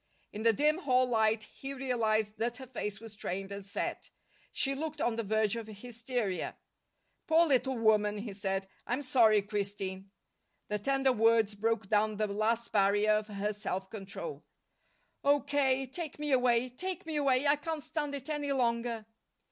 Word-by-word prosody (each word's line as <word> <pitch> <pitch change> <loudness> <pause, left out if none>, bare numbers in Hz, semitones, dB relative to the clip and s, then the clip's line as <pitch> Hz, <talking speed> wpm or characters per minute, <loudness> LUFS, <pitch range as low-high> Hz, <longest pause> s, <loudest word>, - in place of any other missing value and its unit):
In 210 - -5
the 230 +1 +5
dim 300 - +2
hall 255 -6 +3
light 220 -2 +2
he 270 +5 -8
realized 220 -5 0
that 235 +2 -1
her 260 - -8
face 210 -5 -4
was 225 -1 -10
strained 195 -1 -4
and 200 0 -6
set. 200 +2 -4 0.4
She 275 - 0
looked 305 +2 -4
on 240 -4 +1
the 230 - -1
verge 220 0 +1
of 230 -2 -5
hysteria. 230 -2 -3 0.7
"Poor 330 +1 +5
little 265 -3 +2
woman," 210 -2 +3
he 205 0 -5
said. 195 -1 -2 0.2
"I'm 255 +4 -1
sorry, 225 -6 +5
Christine." 200 -2 -4 0.6
The 210 0 -1
tender 270 +3 +2
words 225 -2 +4
broke 220 0 -1
down 215 +1 +2
the 215 - +1
last 215 +3 0
barrier 205 +1 +3
of 215 0 +1
her 210 0 -2
self 190 -2 -4
control. 215 - -6 0.8
"Oh, 285 0 +4
K.! 270 -2 +1
Take 310 +4 -5
me 295 -1 -2
away. 250 -1 +3
Take 360 +8 -4
me 320 -2 -2
away! 275 -1 +2
I 285 +1 +5
can't 315 0 -4
stand 295 -3 -3
it 275 -1 -7
any 295 -2 -2
longer." 235 -3 0
230 Hz, 170 wpm, -31 LUFS, 210-270 Hz, 0.8 s, the